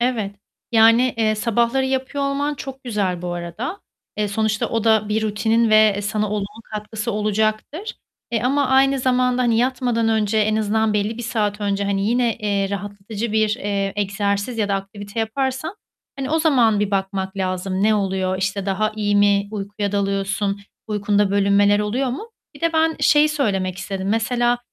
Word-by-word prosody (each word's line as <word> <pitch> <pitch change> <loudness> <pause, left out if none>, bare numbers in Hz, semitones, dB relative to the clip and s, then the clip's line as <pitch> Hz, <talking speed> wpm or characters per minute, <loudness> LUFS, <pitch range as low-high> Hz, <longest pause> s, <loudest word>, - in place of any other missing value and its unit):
Evet, 230 -5 -1 0.4
yani, 230 +2 +5
eee, 220 -1 +2
sabahları 235 +4 +1
yapıyor 265 +1 -2
olman 285 +1 -1
çok 270 -1 -8
güzel 195 -6 -1
bu 175 0 -3
arada. 175 - -5 0.4
Eee, 210 -1 0
sonuçta 215 +1 0
o 225 -1 -1
da 220 -2 +3
bir 215 +1 0
rutinin 220 +2 +1
ve 215 -2 +5
sana 210 0 -1
olumlu 210 +1 -4
katkısı 215 +2 -4
olacaktır, 215 - -1 0.4
eee, 230 -2 0
ama 275 +3 +2
aynı 270 +1 +4
zamanda 250 0 +2
hani, 230 -2 +2
yatmadan 245 -2 +1
önce 220 -1 +1
en 215 0 +2
azından 220 0 +1
belli 210 +2 -1
bir - - -4
saat 215 -3 -1
önce 200 -1 -1
hani 200 0 0
yine, 240 -1 +1
eee, 200 -2 -1
rahatlatıcı 205 +2 -5
bir, 215 0 +3
eee, 200 -2 -2
egzersiz 200 +3 -1
ya 210 -2 +1
da 200 - +1
aktivite 200 +2 -5
yaparsan 265 - -2 0.4
hani, 270 0 -3
o 320 - +2
zaman 245 -10 +3
bir 205 -1 0
bakmak 190 0 -2
lazım 185 0 -2
ne 215 +1 +4
oluyor, 190 -2 -1
işte, 195 0 -2
daha 215 +3 0
iyi 205 -1 +1
mi 200 0 +3
uykuya 205 -1 -4
dalıyorsun, 200 0 -1 0.3
uykunda 205 -1 +1
bölünmeler 200 +1 +3
oluyor 240 +6 -1
mu? 430 - -6 0.2
Bir - - -14
de 335 0 +1
ben 320 0 +2
şeyi 300 0 +5
söylemek 195 -11 -1
istedim. 195 -1 -4
Mesela 240 +3 +1
215 Hz, 170 wpm, -21 LUFS, 200-240 Hz, 0.4 s, yani